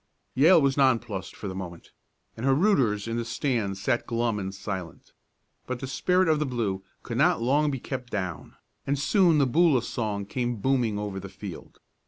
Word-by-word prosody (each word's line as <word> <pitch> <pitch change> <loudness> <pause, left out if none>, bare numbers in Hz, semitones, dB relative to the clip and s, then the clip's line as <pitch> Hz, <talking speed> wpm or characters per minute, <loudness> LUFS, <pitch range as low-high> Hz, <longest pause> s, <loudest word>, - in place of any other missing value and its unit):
Yale 165 +7 +6
was 140 -2 +1
nonplussed 115 -8 +1
for 105 - -6
the 95 - -4
moment, 90 -3 -8 0.4
and 115 - -7
her 135 0 +4
rooters 130 - +2
in 115 0 -2
the 120 - -1
stands 115 -5 -1
sat 120 +4 0
glum 115 -2 0
and 95 0 -5
silent. 95 -4 -7 0.5
But 130 -1 -3
the 135 - -4
spirit 180 +8 +1
of 155 -2 +3
the 150 - 0
blue 105 -7 -2 0.2
could - - -4
not - - +4
long 145 +6 +2
be 135 -2 -3
kept 125 -1 -6
down, 95 -6 -4 0.3
and 140 +1 +1
soon 170 +3 +3
the 140 - +4
Boola 140 -2 +3
song 105 -5 -3
came 120 +3 -2
booming 120 -2 +1
over 105 -2 -4
the 100 +1 -8
field. - - -10
120 Hz, 190 wpm, -27 LUFS, 100-135 Hz, 0.5 s, Yale